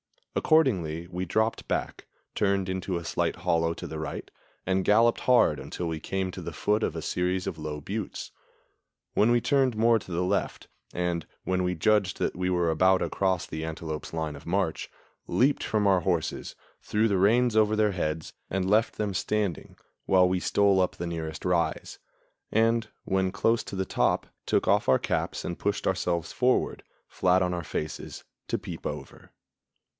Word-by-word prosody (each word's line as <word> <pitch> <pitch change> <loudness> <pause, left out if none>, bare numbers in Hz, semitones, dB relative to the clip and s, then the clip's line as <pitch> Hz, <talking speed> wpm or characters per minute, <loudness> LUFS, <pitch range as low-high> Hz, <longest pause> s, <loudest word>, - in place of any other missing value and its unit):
Accordingly, 90 - +2
we 90 +1 -3
dropped 110 +5 0
back, - - -3 0.3
turned 100 -2 +1
into 95 -1 -2
a 85 - -5
slight - - 0
hollow 85 0 0
to - - -7
the 80 - -5
right, 80 -2 -5 0.3
and 95 0 +1
galloped 115 +3 +4
hard 120 - +4
until 90 - -5
we 80 -1 -3
came 95 +3 -2
to - - -7
the - - -6
foot 105 +1 +1
of - - -1
a - - -3
series 90 +1 -1
of 80 - -4
low 75 -1 -4
buttes, 100 +6 -5 0.8
when 105 - +4
we 120 0 +4
turned 135 -3 +2
more 115 +1 +4
to 95 - -12
the 85 +1 0
left; 100 +2 -2 0.2
and, 85 -2 -2 0.2
when 95 0 0
we 90 0 0
judged 100 +1 +2
that - - -1
we 90 +1 -1
were 90 -2 +2
about 95 +4 +4
across 95 -3 0
the 80 +1 -5
antelope's 80 -1 -5
line 80 -2 -2
of 70 - -12
march, 90 -2 -1 0.4
leaped 140 +3 +2
from 105 -1 0
our 95 -2 +5
horses, 90 -3 -2 0.3
threw 110 +2 +1
the 100 -3 +1
reins 115 +4 +4
over 110 0 +4
their 105 -1 +3
heads, 80 -4 -3 0.2
and 95 -1 -1
left 110 +3 +3
them 105 -2 -2
standing, 100 -2 -2 0.3
while 90 -1 +5
we 90 0 +1
stole 100 +1 +3
up 90 - +1
the 85 - -4
nearest 80 -2 -5
rise; 90 -2 0 0.5
and, 115 +1 +2 0.2
when 95 -1 0
close 115 +3 +1
to - - -7
the 95 0 -1
top, - - +1 0.2
took - - +1
off - - +3
our 65 - +6
caps - - -2
and 85 - -4
pushed 100 0 -1
ourselves 90 -3 0
forward, 125 0 +1 0.3
flat 95 0 +2
on 90 0 0
our 85 -2 -4
faces, 75 +2 -5 0.2
to - - 0
peep - - -6
over. - - -8
95 Hz, 180 wpm, -27 LUFS, 85-105 Hz, 0.8 s, our